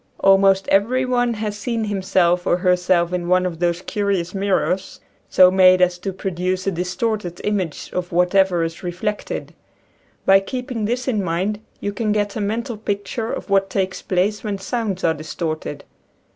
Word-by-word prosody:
Almost 195 0 +4
every 245 +7 +2
one 245 -2 +1
has 210 -1 -3
seen 230 0 -2
himself 185 -3 +1
or 175 - +3
herself 180 -1 +2
in 175 -1 -2
one 185 +1 +3
of 170 -3 -4
those 175 +1 0
curious 195 -4 -1
mirrors 195 -1 -1 0.3
so 185 0 +6
made 185 -1 +6
as 180 -1 +2
to 195 - -3
produce 185 0 -2
a 195 - +1
distorted 180 +1 -2
image 190 -7 -2
of 180 -1 -3
whatever 180 0 +3
is 165 0 -4
reflected. 185 +4 -4 0.7
By 195 0 +7
keeping 250 +2 -4
this 245 +4 -2
in 215 -6 0
mind 185 +5 -1 0.2
you 205 - -3
can 215 +1 -1
get 205 -1 -1
a 215 - -2
mental 225 +3 -2
picture 205 +2 -3
of - - -6
what 195 0 +3
takes 190 -1 -2
place 195 +3 0
when 205 -2 -2
sounds 195 -1 -3
are 165 - +3
distorted. 155 0 -5
195 Hz, 165 wpm, -21 LUFS, 180-210 Hz, 0.7 s, By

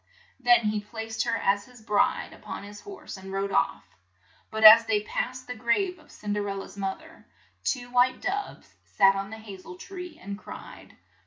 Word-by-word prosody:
Then 245 -2 +5
he 210 -1 0
placed 225 +1 -4
her 230 -1 +1
as 200 +1 +1
his 250 -1 -16
bride 210 -2 +1
up - - -15
on - - -5
his 205 0 -10
horse, 390 - -9
and 190 0 -9
rode 195 +1 -2
off. - - +1 0.7
But 220 0 -3
as 225 +1 +11
they 210 -2 +2
passed 255 +4 -3
the 250 - -5
grave 250 - 0
of 310 - -19
Cin 205 -1 -4
der 205 -1 -1
el 195 - -3
la's 195 - -8
moth 195 +8 -3
er, 320 +1 -17 0.4
two 245 -2 -2
white 250 +1 +3
doves 400 +1 -4
sat 195 -1 +4
on 195 0 -4
the 220 - -7
ha 215 -3 -9
zel 180 -1 -10
tree, 360 - -9
and 200 0 -7
cried. - - -11
220 Hz, 200 wpm, -27 LUFS, 200-250 Hz, 0.7 s, as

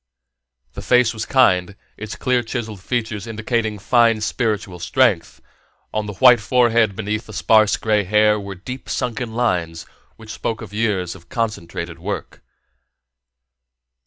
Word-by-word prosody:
The - - -7
face 125 -2 +3
was 110 0 -5
kind, 100 -8 +3 0.2
its 110 0 -7
clear 125 -1 +1
chiselled 115 -3 -5
features 110 -2 -3
indicating 110 -1 -2
fine 115 +2 +3
spiritual 105 -4 -2
strength; 110 -2 +1 0.5
on 110 -1 -2
the 105 - -6
white 125 +4 +6
forehead 115 -2 +2
beneath 110 +1 -3
the - - -10
sparse 110 -2 +3
gray 105 -2 +1
hair 105 +2 +3
were 100 -1 -7
deep 125 +8 -8
sunken 125 -2 -3
lines 90 -9 -1 0.3
which 110 -1 -11
spoke 115 0 -4
of 105 -2 -11
years 105 -5 -1
of 85 -2 -16
concentrated 85 -7 -4
work. - - -6
110 Hz, 135 wpm, -20 LUFS, 100-120 Hz, 0.5 s, white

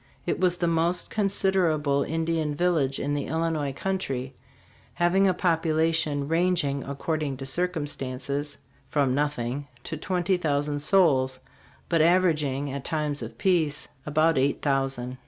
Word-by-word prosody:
It - - -1
was 180 -1 +2
the 175 - -1
most 170 +1 0
considerable 185 -8 +2
Indian 160 -1 -1
village 150 -5 +1
in 145 +1 -1
the 145 -1 -2
Illi 165 +2 0
nois 145 -4 -2
country, 135 -9 -3 0.6
having 180 +3 +3
a 185 - +3
population 160 -4 +1
ranging, 165 -4 +1
according 140 0 -3
to 135 - -6
circumstances, 145 -3 -2 0.3
from 140 -2 +1
nothing 145 -1 -2 0.2
to 160 - -4
twenty 180 +3 0
thousand 145 -3 0
souls, 140 -6 +3 0.5
but 165 -2 +2
averaging, 155 -5 +2
at 140 -1 -5
times 150 -3 -2
of - - -7
peace, 170 -7 +1
about 155 0 +2
eight 140 +2 0
thousand. 135 -3 -1
150 Hz, 135 wpm, -26 LUFS, 140-170 Hz, 0.6 s, having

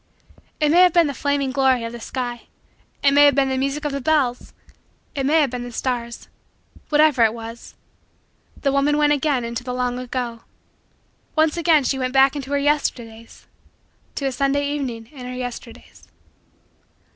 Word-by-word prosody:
It 300 -1 +2
may 335 +4 +4
have 360 -2 +5
been 340 -1 +5
the 285 - -2
flaming 280 -1 -1
glory 260 -2 +2
of 230 - -5
the 240 - -8
sky; 240 0 -5 0.6
it 280 - +5
may 290 +1 +6
have 285 -2 +5
been 275 -1 +2
the 265 - -1
music 275 +3 -2
of 295 - -1
the 280 0 -4
bells; 260 -4 0 0.6
it 275 -2 -2
may 315 +2 +4
have 280 -4 0
been 250 -1 -4
the 245 - -8
stars 235 -1 -4 0.6
whatever 295 -5 +4
it 225 0 +2
was 230 0 -10 0.8
the 275 - 0
woman 280 +2 +2
went 295 0 +3
again 280 -4 0
into 235 +1 -5
the 250 0 -4
long 250 0 -2
ago. 245 -2 -4 0.9
Once 315 -1 +2
again 330 -4 +3
she 265 +1 -1
went 255 0 -2
back 270 +1 +4
into 275 -2 -6
her 285 - +1
Yesterdays 240 -6 -2 0.7
to 280 - -3
a 270 - 0
Sunday 275 +2 0
evening 250 -6 -4
in 255 -4 -9
her 250 - -6
Yesterdays. 245 -1 -9
270 Hz, 180 wpm, -21 LUFS, 245-290 Hz, 0.9 s, may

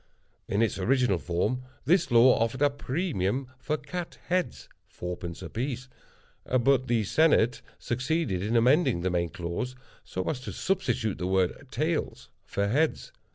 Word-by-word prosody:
In 105 +3 +2
its 110 - -1
original 120 -2 +2
form, 90 +10 -1 0.2
this 180 +4 +3
law 120 +2 +7
offered 115 +5 0
a 145 - +4
premium 135 - -1
for 155 +3 -1
cat 170 +4 -6
heads 180 0 -1 0.2
(fourpence 85 -1 -6
a - - -6
piece), 125 +1 -3 0.5
but 130 +1 +2
the 115 -2 +2
Senate 125 -1 +3 0.2
succeeded 125 - -1
in 110 +4 -1
amending 130 - +4
the 95 +1 0
main 85 -1 0
clause, 90 +8 -4 0.3
so 95 - -4
as 145 - -1
to 130 - -7
substitute 185 - -1
the 90 - -1
word 95 +8 0
"tails" 155 +6 -2 0.2
for 100 0 0
"heads." 150 +9 0
125 Hz, 150 wpm, -28 LUFS, 100-145 Hz, 0.5 s, law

